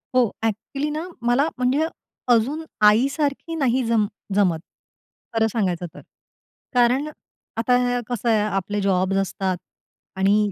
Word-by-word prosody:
हो, 250 -3 +4
ॲक्च्युअलीनां 280 - -2 0.2
मला 260 +5 +3
म्हणजे 255 +5 +2 0.5
अजून 270 +8 +1 0.2
आईसारखी 280 +8 +2
नाही 260 -4 +1
जम 225 -2 +2 0.3
जमत, 185 -5 +3 0.7
खरं 225 -1 +3
सांगायचं 185 -6 -1
तर. - - -11 0.7
कारण 250 +4 +3 0.5
आता 245 +1 +2
कसं 240 -1 -1
आहे 220 -2 +4 0.2
आपले 205 +2 -1
जॉब्स 190 0 +1
असतात 190 -1 -1 0.6
आणि 205 +2 +3
230 Hz, 115 wpm, -23 LUFS, 200-265 Hz, 0.7 s, हो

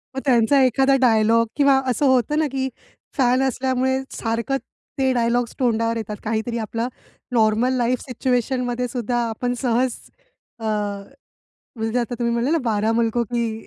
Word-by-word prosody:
मग - - -1
त्यांचा 260 +1 +4
एखादा 270 +2 +3
डायलॉग 230 -1 +4
किंवा 280 -2 +4
असं 255 +4 +1
होतं 260 +3 +2
ना, 310 - +2
की 265 0 -1 0.5
फॅन 255 0 +3
असल्यामुळे 260 0 0
सारखं 230 +4 -2 0.4
ते 265 -1 +2
डायलॉग्स 240 0 0
तोंडावर 230 -2 +1
येतात. 215 -1 -4
काहीतरी 225 +2 -2
आपलं 230 +2 -3 0.5
नॉर्मल 225 +2 +3
लाईफ 245 0 +1
सिच्युएशन 250 0 -1
मध्येसुद्धा 245 -1 -2
आपण 245 +2 -2
सहज 250 0 +1 0.7
अ, - - -10 1.1
म्हणजे 225 +2 -1
आता 245 0 -2
तुम्ही 235 -1 0
म्हणले 235 +4 0
ना, 330 - +3
12 220 -1 +1
मुलकों 230 +1 +1
की 225 -1 -3
245 Hz, 145 wpm, -22 LUFS, 230-260 Hz, 1.1 s, त्यांचा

